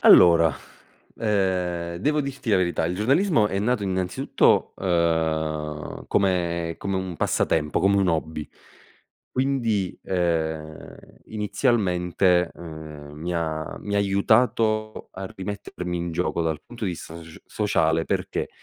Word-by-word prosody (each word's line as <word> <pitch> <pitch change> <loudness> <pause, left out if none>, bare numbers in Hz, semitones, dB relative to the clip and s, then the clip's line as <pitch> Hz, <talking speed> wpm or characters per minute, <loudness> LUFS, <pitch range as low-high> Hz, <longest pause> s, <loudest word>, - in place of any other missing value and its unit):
Allora, 85 -4 +7 0.6
ehm, 90 -5 0
devo 150 - +1
dirti 140 -4 -4
la 100 - +5
verità: 85 -3 +1
il 90 - -2
giornalismo 135 - +3
è 95 - -2
nato, 110 +2 +1
innanzitutto, 95 -2 +1
ehm, 80 -4 -1
come 85 -4 0
come 100 -1 -2
un 95 -2 -4
passatempo, 75 -2 +1
come 100 +1 +4
un 95 -2 +3
hobby, 80 -2 -2 0.8
quindi, 120 -8 0
ehm, 80 -4 -2 0.3
inizialmente, 95 -5 +1
ehm, 80 -3 -9
mi 85 +4 -4
ha 80 -2 -3
mi 100 - -4
ha - - +3
aiutato 110 +2 +2
a 95 +1 -6
rimettermi 95 -2 -5
in 85 0 -3
gioco 85 0 -1
dal 80 -2 -2
punto 120 -2 -7
di 95 - 0
vista 80 -1 -9
soc 80 0 -13
sociale, 80 -6 +1
perché? - - -2
90 Hz, 125 wpm, -24 LUFS, 80-105 Hz, 0.8 s, Allora